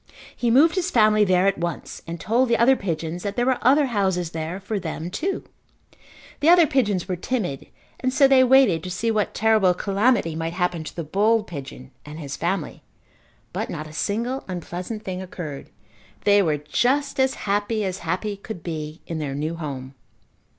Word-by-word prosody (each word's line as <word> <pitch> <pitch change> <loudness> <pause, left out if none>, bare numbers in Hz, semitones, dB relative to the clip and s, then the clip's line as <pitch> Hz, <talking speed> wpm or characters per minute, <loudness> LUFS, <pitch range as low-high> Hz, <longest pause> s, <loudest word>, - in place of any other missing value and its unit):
He 240 - 0
moved 295 +8 +5
his 370 -1 0
family 215 -6 +4
there 185 -1 +3
at 195 -3 +1
once 170 0 -4
and 170 0 -5
told 240 +3 +1
the 235 - +3
other 255 +3 +5
pigeons 170 -4 -3
that 200 +1 -4
there 245 - +1
were 260 -1 +1
other 280 +4 +5
houses 190 -8 0
there 165 +3 -4
for 200 +2 -3
them 170 -1 -5
too. 375 - -2 1.0
The 295 +3 +3
other 345 -1 +7
pigeons 210 - 0
were 185 - -1
timid 180 - -3 0.3
and 255 - 0
so 275 +1 +5
they 265 -1 +6
waited 255 -10 +5
to 185 - -6
see 225 +6 -1
what 215 -2 -1
terrible 215 -4 +3
calamity 200 -3 +1
might 165 +1 -3
happen 180 -2 -1
to - - -8
the 170 - -3
bold 210 +7 +2
pigeon 135 -5 -9
and 150 +1 -9
his 140 -3 -5
family, 185 +4 -3 0.7
but - - -3
not 155 -2 -5
a 155 - -11
single 235 +10 -2
unpleasant 180 +4 -5
thing 185 -1 -4
occurred. 165 -6 -7 0.5
They 205 0 +5
were 155 -5 +1
just 265 - 0
as 265 0 +2
happy 205 +2 0
as 190 0 -3
happy 185 +5 -3
could 200 -4 -8
be 155 -1 -5
in 165 -2 -4
their 140 -3 -3
new 155 +3 -2
home. 140 -5 -6
195 Hz, 185 wpm, -23 LUFS, 165-235 Hz, 1.0 s, other